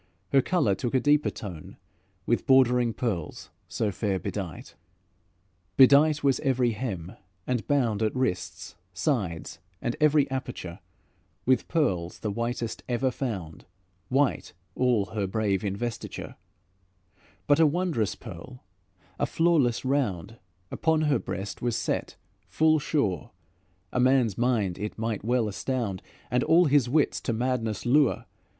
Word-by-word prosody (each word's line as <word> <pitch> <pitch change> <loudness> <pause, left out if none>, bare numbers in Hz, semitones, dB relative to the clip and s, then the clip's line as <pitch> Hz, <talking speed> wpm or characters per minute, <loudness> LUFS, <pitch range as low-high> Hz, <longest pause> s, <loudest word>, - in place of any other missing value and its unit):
Her 135 - +5
colour 145 - +1
took 120 +6 -2
a - - +5
deeper 145 +2 +3
tone 90 -7 -9 0.5
With 120 - 0
bordering 125 -3 +4
pearls 105 -10 -4 0.2
so 105 - -1
fair 100 0 -1
bedight. 95 -5 -6 1.0
Bedight 145 +3 +6
was 135 -2 +3
every 130 -4 +1
hem, 100 -7 -4 0.3
and 125 -3 -2
bound, 120 -7 +1
At 110 +2 0
wrists, 90 -10 -2 0.2
sides, 90 - -2 0.2
and 120 - -2
each 150 -1 +4
aperture, 95 -9 -5 0.7
With 130 0 +2
pearls 95 - 0
the 105 - -2
whitest 115 +1 -3
ever 125 +2 +1
found, 95 - -5 0.4
White 135 +1 +1 0.2
all 125 -5 +2
her 105 -3 -1
brave 100 -1 0
investiture; 115 +4 -4 1.1
But 145 +1 +4
a 160 - +6
wondrous 150 - 0
pearl, 110 +9 -11 0.6
a - - +1
flawless 155 -9 +2
round, 115 - -1 0.3
Upon 160 -1 +1
her 150 -3 +2
breast 100 +2 -5
was 120 -2 0
set - - -2 0.3
full 155 0 +3
sure; 110 - -1 0.6
A - - 0
man's 125 -5 +3
mind 115 -7 0
it 105 +1 -5
might 110 -2 -3
well 120 0 +1
astound, 105 -2 -3 0.3
And 125 0 +2
all 175 +2 +5
his 140 -4 +3
wits 150 +3 +1
to 120 - -2
madness 115 -3 -2
lure. 140 +1 +3
120 Hz, 130 wpm, -27 LUFS, 100-135 Hz, 1.1 s, Bedight